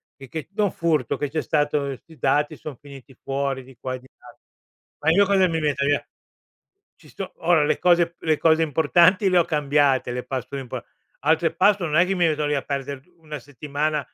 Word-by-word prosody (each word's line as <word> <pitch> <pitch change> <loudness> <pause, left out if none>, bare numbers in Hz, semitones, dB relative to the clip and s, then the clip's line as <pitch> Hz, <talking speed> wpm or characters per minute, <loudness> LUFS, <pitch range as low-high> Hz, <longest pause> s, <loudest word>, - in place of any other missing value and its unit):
perché 140 +3 -8
da 210 +1 0
un 200 - +1
furto 155 -7 0
che 145 - -2
c'è 155 +2 -2
stato, 150 -1 +1
questi 140 +4 -7
dati 150 +3 +1
son 145 -4 -9
finiti 140 -1 -14
fuori 135 -1 -2
di 130 +1 -16
qua 130 - -4
e - - -8
di 130 - -19
là. - - -16 0.6
Ma 155 - +1
io 200 +4 +5
cosa 190 -1 +3
mi 165 -2 -1
metto 145 -2 0
via? 145 0 +1 0.9
Ci - - -18
sto - - -7
ora 170 -3 +3
le 145 - +1
cose 175 -1 +4
p - - -41
le 155 -2 +2
cose 160 0 +4
importanti 170 +5 +3
le 180 - +3
ho 170 - +4
cambiate, 145 -4 +1
le 125 0 -4
password 130 +1 -5
impo 125 - -7 0.4
altre 160 +2 +2
password 185 -2 +3
non 155 - +4
è - - +4
che 195 +1 -1
mi 175 -2 +3
metto 150 -1 0
lì 145 - 0
a 140 - -1
perder 140 -1 -4 0.2
una 150 -2 -8
settimana 145 +3 -3
150 Hz, 210 wpm, -23 LUFS, 140-165 Hz, 0.9 s, io